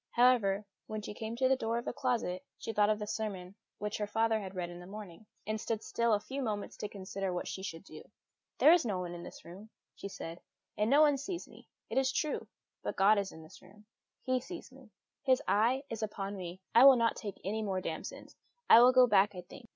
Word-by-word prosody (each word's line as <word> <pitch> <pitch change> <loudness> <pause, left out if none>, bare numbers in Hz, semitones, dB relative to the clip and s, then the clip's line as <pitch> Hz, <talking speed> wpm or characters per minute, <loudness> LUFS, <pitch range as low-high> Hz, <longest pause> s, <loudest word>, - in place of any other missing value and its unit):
However, 225 -5 +3 0.2
when 215 -1 -5
she - - -6
came 220 +2 -5
to 260 +2 +2
the 265 - +4
door 230 -2 -1
of 235 - -4
the - - -3
closet, 235 -9 -1
she 225 - -5
thought 210 0 +3
of 215 - +2
the 210 - -4
sermon 200 -4 -4 0.2
which 210 0 -4
her 210 - -1
father 225 +1 +1
had 195 -2 -7
read 175 -1 -3
in 175 - -9
the 175 - -11
morning, 205 0 -10 0.2
and 215 +1 -2
stood 225 -2 -2
still 235 -2 +1
a - - -1
few 265 +6 -5
moments 210 -5 -3
to 210 - -5
consider 195 -1 -4
what 180 - -3
she 190 - -5
should 170 -4 -6
do. - - -11 0.6
"There 305 - +7
is 350 - +4
nobody 180 -6 -3
in 175 - -7
this - - -11
room," 190 +6 -11 0.2
she - - -7
said; 170 -3 -8 0.3
"and 210 +1 +1
nobody 290 +1 +5
sees 345 +6 -5
me, - - -16 0.2
it - - +1
is 265 0 +1
true, 305 +2 -2 0.3
but - - -4
God 200 +2 +5
is 200 -1 -3
in 160 - -12
this 155 - -15
room; 210 +1 -18 0.4
He 255 0 +1
sees 335 +1 -9
me; 260 -3 -16 0.3
His 260 -1 +3
eye 240 +6 +2
is 225 -3 -6
now 215 - 0
upon 200 -1 -5
me. 180 -1 -7
I 235 - +8
will 275 -1 +10
not 230 -1 +2
take 205 -4 -7
any 215 +4 -2
more 195 -3 -1
damsons. 185 - -6 0.3
I 230 - +9
will 250 +1 +7
go 255 0 +7
back, 205 -3 +3
I 180 - -5
think. 230 +6 -14
215 Hz, 235 wpm, -32 LUFS, 195-240 Hz, 0.6 s, will